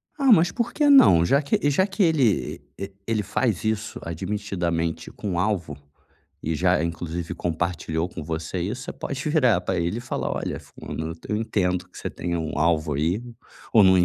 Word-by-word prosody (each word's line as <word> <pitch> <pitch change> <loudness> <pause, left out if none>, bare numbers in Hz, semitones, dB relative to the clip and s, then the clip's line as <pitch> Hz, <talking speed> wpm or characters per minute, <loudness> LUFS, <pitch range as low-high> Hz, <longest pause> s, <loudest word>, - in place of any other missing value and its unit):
Ah, 275 -4 +3
mas 175 -3 +6
por 235 0 -2
que 295 -1 +3
não? 90 - +7
Já 140 - +3
que 145 0 +1
já 185 +7 +3
que 195 0 0
ele 125 - +2 0.2
e - - -5
e 95 - -14
ele 110 -2 0
faz 105 0 0
isso 110 -1 -2
admitidamente 85 -2 -2
com 90 -4 -3
alvo, 90 -7 -1 0.7
e 80 +1 -1
já, 75 - +2
inclusive, 85 0 -3
compartilhou 85 -1 -2
com 80 -4 -7
você 80 +2 -3
isso, 110 +9 -3
você 170 - -6
pode 135 -1 -5
virar 125 - +4
pra 90 - -2
ele 85 +7 -1
e - - -5
falar: 120 - -3
"Olha, - - -3
fulano 80 +1 -6 0.2
eu 105 - 0
entendo 90 -5 0
que - - -18
você - - -3
tenha 85 -1 -3
um 80 -2 -3
alvo 80 -2 +2
aí, 85 - 0 0.5
ou 110 -4 +7
não 95 0 +6
95 Hz, 190 wpm, -24 LUFS, 85-120 Hz, 0.7 s, não